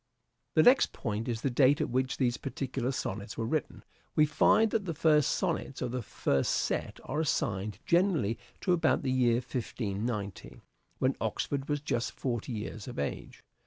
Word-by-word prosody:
The - - +6
next 255 +2 +5
point 110 +1 -3
is 115 -2 -2
the 135 - 0
date 135 +3 +4
at - - -1
which 130 +1 0
these 120 -3 +1
particular 130 -1 -3
sonnets 100 -4 -4
were 115 - -1
written. 150 +5 -2 0.3
We 155 - +6
find 210 +8 +4
that 220 -3 0
the 165 -3 -3
first 150 -2 +4
sonnets 135 - -1
of 125 -2 -2
the 125 0 -2
first 70 -10 0
set - - -1
are 150 - -3
assigned 105 - -1
generally 170 - +2 0.2
to 180 - +2
about 170 - +2
the 130 - 0
year 125 -2 +3
1590, 110 -4 -4 0.4
when - - +1
Oxford 140 0 -2
was 145 -1 0
just 120 -5 -1
forty 120 -2 -3
years 110 -1 -5
of 125 - -7
age. 70 - -4
130 Hz, 170 wpm, -30 LUFS, 115-150 Hz, 0.4 s, The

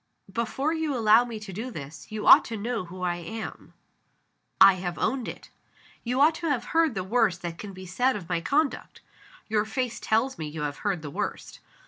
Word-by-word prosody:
Before 265 +6 -1
you 320 -4 -1
allow 225 +1 +5
me 230 -3 -6
to 205 -3 -8
do 225 +7 -4
this, 145 - -9
you 215 -1 -4
ought - - +9
to 225 - -5
know 225 -1 -3
who 180 +1 -8
I 175 -1 0
am. 215 +6 -7 0.8
(I 195 - +9
have 175 -2 -4
owned 260 -3 -1
it.) - - -9 0.5
You 250 +2 -1
ought 305 +3 +6
to 335 - -1
have 255 -5 0
heard 325 -6 +3
the 185 - -2
worst 200 -3 +1
that 170 -1 -5
can 205 - -7
be 185 0 -10
said 245 +8 +1
of 190 -5 -6
my 175 -1 -1
conduct. 285 - -1 0.5
(Your 215 -1 +1
face 240 +2 -3
tells 230 +3 0
me 155 - -3
you 150 0 -5
have 145 -1 -3
heard 195 -6 -2
the 145 - -6
worst.) - - -4
215 Hz, 205 wpm, -27 LUFS, 180-250 Hz, 0.8 s, ought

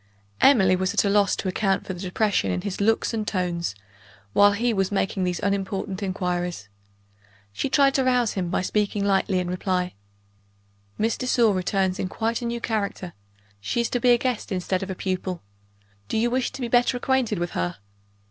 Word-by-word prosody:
Emily 195 -9 +6
was 185 +1 -1
at - - +3
a 200 - +2
loss 205 -1 +3
to - - -4
account 195 +1 0
for 190 - -4
the 180 - -9
depression 200 +3 0
in 180 - -1
his 200 0 -4
looks 225 +3 +2
and 215 -2 -2
tones, 175 - -2 0.6
while 205 0 +6
he 235 +3 +1
was 195 -1 0
making 195 -1 0
these 180 -1 -1
unimportant 195 0 -2
inquiries. 180 - -3 0.8
She 265 - -2
tried 275 0 +4
to 270 - +2
rouse 250 -3 +2
him 180 -3 -2
by 185 - 0
speaking 205 +1 0
lightly 195 -1 +2
in 180 -1 -1
reply. 180 0 -1 1.0
"Miss 225 +2 0
de 255 - -3
Sor 235 -4 +4
returns 185 0 0
in 185 - -2
quite 225 +4 -2
a - - -4
new 235 0 -2
character; 200 -6 -3 0.5
she 100 - -2
is 235 - -2
to 245 - 0
be 245 - +3
a 240 - +6
guest 250 -3 -2
instead 185 0 -1
of 195 - -5
a 190 - -3
pupil. 185 - -3 0.6
Do - - -2
you 235 +2 +1
wish 255 0 0
to 270 - -7
be 245 - -1
better 245 +1 +3
acquainted 250 -4 0
with 175 0 -2
her?" 90 0 -2
200 Hz, 195 wpm, -24 LUFS, 185-230 Hz, 1.0 s, Emily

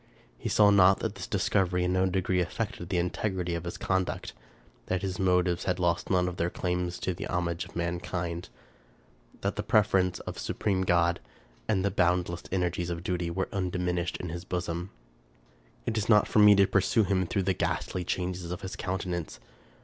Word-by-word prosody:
He - - -4
saw 105 -1 +5
not 95 -1 +6
that - - -2
this - - -7
discovery 90 -2 +1
in 90 +1 +1
no 95 0 +3
degree 95 0 +1
affected 90 -1 -4
the 90 - 0
integrity 90 0 -1
of 85 0 -4
his 85 - -5
conduct; 95 -1 -1 0.5
that 95 +1 -1
his 95 -2 -3
motives 90 -2 +2
had 90 -1 0
lost 85 -1 0
none 90 -1 +2
of 90 -1 -4
their 85 - 0
claims 90 0 -2
to 95 - -1
the 85 - -5
homage 85 0 -1
of - - -16
mankind; 85 0 -3 0.9
that - - -2
the - - 0
prefer 105 -2 +3
ence 90 -1 0
of - - -7
supreme 95 -3 -1
good, 85 -1 +3 0.5
and 100 -3 +1
the 100 - +1
boundless 90 -2 +1
energy 90 -2 0
of 85 0 -4
duty, 90 -2 -1
were 95 +3 -2
undiminished 90 -2 -1
in 90 - -5
his 85 +2 -5
bosom. 90 0 -3 1.0
It 115 - -1
is 110 - -3
not 105 -2 +6
for - - +2
me 105 -1 +8
to 100 0 +6
pursue 95 +3 +2
him 95 -2 +1
through 95 - 0
the 95 +1 +1
ghastly 90 0 -2
changes 90 0 -3
of 90 - -5
his 95 - -5
countenance. 90 -7 -3
90 Hz, 190 wpm, -29 LUFS, 85-95 Hz, 1.0 s, me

